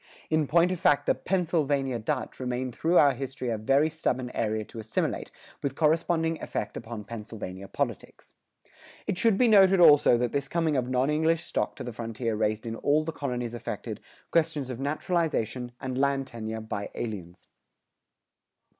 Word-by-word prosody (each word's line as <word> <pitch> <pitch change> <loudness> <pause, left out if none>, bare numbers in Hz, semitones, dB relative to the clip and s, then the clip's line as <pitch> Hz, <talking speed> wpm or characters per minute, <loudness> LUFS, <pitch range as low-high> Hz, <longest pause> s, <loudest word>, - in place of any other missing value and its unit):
In 155 -2 +2
point 170 +4 +4
of 185 - -2
fact 145 - +3
the - - +4
"Pennsylvania 150 -8 0
Dutch" 110 - -3
remained 125 0 -2
through 165 +7 +2
our 140 -2 +6
history 130 -1 -4
a 115 - -1
very 135 +7 +3
stubborn 130 -6 -2
area 110 -1 -1
to 115 - -10
assimilate, 110 0 -2 0.3
with 135 -1 -2
corresponding 165 +1 +1
effect 105 - -4
upon 115 -2 -6
Pennsylvania 105 -4 -7
politics. - - -4 0.7
It 180 - -2
should 225 -4 +3
be 250 - +4
noted 195 -3 +6
also 145 -7 +7
that 120 0 0
this 140 -1 -1
coming 165 -1 0
of 125 -2 0
non 130 +3 +2
English 160 +2 +2
stock 105 - -2
to - - -7
the 120 - -6
frontier 115 0 -3
raised 110 +1 -1
in 115 -1 -3
all 150 +2 +2
the 160 - -3
colonies 125 -6 -3
affected, 120 - -5 0.3
questions 155 -5 +1
of 125 - -6
naturalization 140 - -1
and 130 -1 -4
land 140 -1 +1
tenure 110 -2 -5
by 105 -2 -4
aliens. 95 -6 -6
135 Hz, 165 wpm, -28 LUFS, 115-160 Hz, 0.7 s, also